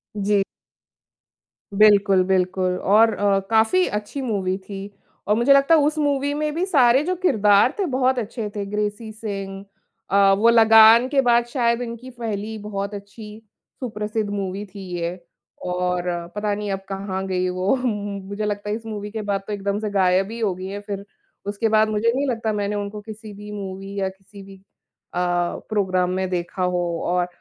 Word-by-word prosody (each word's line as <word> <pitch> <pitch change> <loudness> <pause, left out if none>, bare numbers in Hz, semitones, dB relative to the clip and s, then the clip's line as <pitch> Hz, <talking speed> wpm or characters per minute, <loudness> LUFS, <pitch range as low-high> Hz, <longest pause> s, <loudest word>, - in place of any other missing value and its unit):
जी। 205 -1 +2 1.3
बिल्कुल, 200 -2 +5
बिल्कुल 185 0 0
और 220 +3 +4
अ, 200 -1 +2
काफ़ी 225 +12 +3
अच्छी 210 +6 -4
मूवी 195 -7 -1
थी। 195 +1 -8 0.4
और 210 - +3
मुझे 240 +5 +5
लगता 275 +4 +5
है 310 - +4
उस 300 +2 +1
मूवी 285 -1 +1
में 300 0 -2
भी 350 +3 0
सारे 265 -6 +4
जो 365 +3 -1
किरदार 210 - +4
थे 395 - +1
बहुत 260 -3 +1
अच्छे 220 -1 -4
थे 205 -1 -3
ग्रेसी 210 +2 -3
सिंह 195 -3 -6 0.4
अ, 195 0 +5
वो 225 +3 +4
लगान 225 +1 +7
के 275 -1 +3
बाद 240 -2 +3
शायद 240 -1 0
इनकी 235 +1 -6
पहली 220 -1 -4
बहुत 200 -1 -5
अच्छी, 210 +2 -10 0.4
सुप्रसिद्ध 215 -3 -3
मूवी 200 0 -3
थी 200 0 -12 0.2
ये। 170 0 -1 0.6
और 180 0 -1 0.3
पता 205 0 -1
नहीं 205 0 -4
अब 195 - -2
कहाँ 195 -1 -4
गई 185 -1 0
वो 185 +6 +1
मुझे 205 -4 -3
लगता 205 0 -3
है 210 - 0
इस 225 0 -9
मूवी 210 -2 -6
के 220 0 -4
बाद 200 -1 -1
तो 210 - -3
एकदम 200 0 -2
से 215 -1 -3
गायब 190 0 +2
ही 230 - -6
हो 210 -4 0
गई 185 +1 -7
हैं 200 +1 -5
फिर, 200 -1 -5 0.4
उसके 205 +3 -1
बाद 215 0 +4
मुझे 215 +2 +1
नहीं 280 +2 0
लगता 225 -3 -1
मैंने 205 0 -2
उनको 205 +1 -4
किसी 215 0 -10
भी 210 +1 -10
मूवी 195 -1 -6
या 190 -1 0
किसी 195 +1 -14
भी 195 0 -13 0.6
अ, 175 - -1 0.5
प्रोग्राम 185 -4 +1
में 185 0 -1
देखा 180 +1 -3
हो 180 -1 0 0.2
और 180 0 +1
210 Hz, 180 wpm, -22 LUFS, 195-225 Hz, 1.3 s, लगान